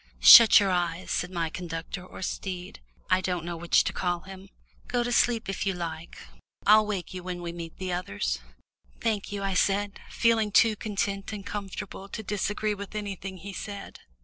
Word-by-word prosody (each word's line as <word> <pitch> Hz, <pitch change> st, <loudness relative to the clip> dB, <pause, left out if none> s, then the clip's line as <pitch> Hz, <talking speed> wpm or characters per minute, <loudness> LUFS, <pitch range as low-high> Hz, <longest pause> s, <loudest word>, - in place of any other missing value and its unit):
"Shut 225 Hz, -, +11 dB
your 200 Hz, -2 st, +1 dB
eyes," 175 Hz, 0 st, -1 dB
said 180 Hz, -, -1 dB
my 170 Hz, -3 st, -2 dB
conductor 170 Hz, +1 st, -6 dB
or 185 Hz, -, -9 dB
steed, 180 Hz, -1 st, -5 dB, 0.3 s
I 185 Hz, 0 st, +4 dB
don't 180 Hz, -3 st, -2 dB
know 175 Hz, 0 st, -4 dB
which 170 Hz, +1 st, +3 dB
to -, -, -3 dB
call 175 Hz, -1 st, -1 dB
him; 190 Hz, +1 st, -11 dB, 0.4 s
"go 245 Hz, -1 st, 0 dB
to 245 Hz, -, -2 dB
sleep 235 Hz, -2 st, +2 dB
if 195 Hz, -, -3 dB
you 195 Hz, -1 st, 0 dB
like. 165 Hz, -2 st, -6 dB, 0.5 s
I'll 215 Hz, 0 st, +6 dB
wake 195 Hz, -4 st, -4 dB
you 185 Hz, -, -6 dB
when 175 Hz, -1 st, -6 dB
we 170 Hz, -, -4 dB
meet 170 Hz, -1 st, -8 dB
the 185 Hz, -1 st, -3 dB
others." 100 Hz, -, -2 dB, 0.6 s
"Thank 215 Hz, -4 st, -1 dB
you," 200 Hz, -1 st, -4 dB
I 195 Hz, -1 st, -1 dB
said, 200 Hz, +2 st, +1 dB
feeling 225 Hz, -2 st, +2 dB
too 220 Hz, +1 st, +5 dB
content 200 Hz, -1 st, -3 dB
and 200 Hz, -2 st, -7 dB
comfortable 200 Hz, -1 st, -6 dB
to 220 Hz, -, -6 dB
disagree 210 Hz, +1 st, -1 dB
with 200 Hz, 0 st, -8 dB
anything 195 Hz, -2 st, -5 dB
he 195 Hz, +3 st, -8 dB
said. 200 Hz, +1 st, -7 dB
195 Hz, 185 wpm, -27 LUFS, 175-205 Hz, 0.6 s, Shut